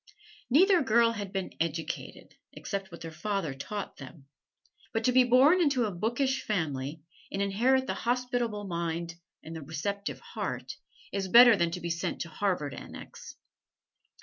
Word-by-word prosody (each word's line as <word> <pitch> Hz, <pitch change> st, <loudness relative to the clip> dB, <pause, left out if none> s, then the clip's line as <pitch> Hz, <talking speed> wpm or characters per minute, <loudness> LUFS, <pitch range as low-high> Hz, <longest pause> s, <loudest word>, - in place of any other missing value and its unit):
Neither 360 Hz, +7 st, +5 dB
girl 235 Hz, -3 st, +4 dB
had 205 Hz, -4 st, -5 dB
been 195 Hz, -2 st, -4 dB
"educated," 165 Hz, 0 st, -4 dB, 0.2 s
except 195 Hz, -2 st, -5 dB
what 170 Hz, -, -10 dB
their 165 Hz, -, -6 dB
father 185 Hz, -2 st, -2 dB
taught 200 Hz, +9 st, -6 dB
them. 135 Hz, +1 st, -12 dB, 0.7 s
But 225 Hz, -, 0 dB
to 250 Hz, -, +3 dB
be 255 Hz, 0 st, +6 dB
born 265 Hz, +9 st, +5 dB
into 275 Hz, -7 st, +2 dB
a 210 Hz, -, -2 dB
bookish 240 Hz, +8 st, 0 dB
family, 150 Hz, -, -3 dB, 0.3 s
and 195 Hz, -, -3 dB
inherit 240 Hz, +7 st, +2 dB
the -, -, -2 dB
hospitable 245 Hz, -3 st, -1 dB
mind 170 Hz, -2 st, -3 dB, 0.3 s
and 165 Hz, -, -8 dB
the 160 Hz, -, -6 dB
receptive 195 Hz, +7 st, -4 dB
heart, -, -, -5 dB, 0.3 s
is 195 Hz, -1 st, -2 dB
better 240 Hz, +3 st, +9 dB
than 170 Hz, -3 st, +1 dB
to 175 Hz, +1 st, -5 dB
be 170 Hz, 0 st, -3 dB
sent 165 Hz, 0 st, -3 dB
to 170 Hz, -, -4 dB
Harvard 160 Hz, -5 st, -1 dB
Annex. -, -, -10 dB
200 Hz, 155 wpm, -29 LUFS, 165-240 Hz, 0.7 s, better